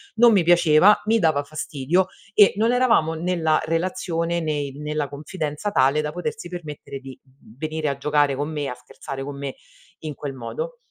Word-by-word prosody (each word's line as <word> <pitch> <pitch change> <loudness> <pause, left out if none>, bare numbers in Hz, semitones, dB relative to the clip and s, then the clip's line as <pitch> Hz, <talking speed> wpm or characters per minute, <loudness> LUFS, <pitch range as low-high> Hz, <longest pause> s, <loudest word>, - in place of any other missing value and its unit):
non 235 +1 +6
mi 195 -4 +4
piaceva, 175 +3 +5
mi 225 +1 +3
dava 155 -6 +2
fastidio 155 +4 -1 0.3
e 205 -2 +7
non 225 +3 +2
eravamo 230 -11 +3
nella 165 -2 +1
relazione, 170 0 -1
né 145 -3 -2
nella 150 +1 -3
confidenza 150 +5 -4
tale 135 -1 +3
da 150 0 -3
potersi 180 +2 -5
permettere 155 -5 -7
di 135 -1 -11 0.4
venire 155 +1 -3
a 140 -1 -1
giocare 145 0 +2
con 145 +3 -3
me, 145 -2 -3
a 125 - -4
scherzare 135 +2 -8
con 140 0 -6
me, 140 -1 -5 0.4
in 155 -2 -6
quel 140 0 -5
modo. 475 - -5
155 Hz, 170 wpm, -23 LUFS, 145-175 Hz, 0.4 s, e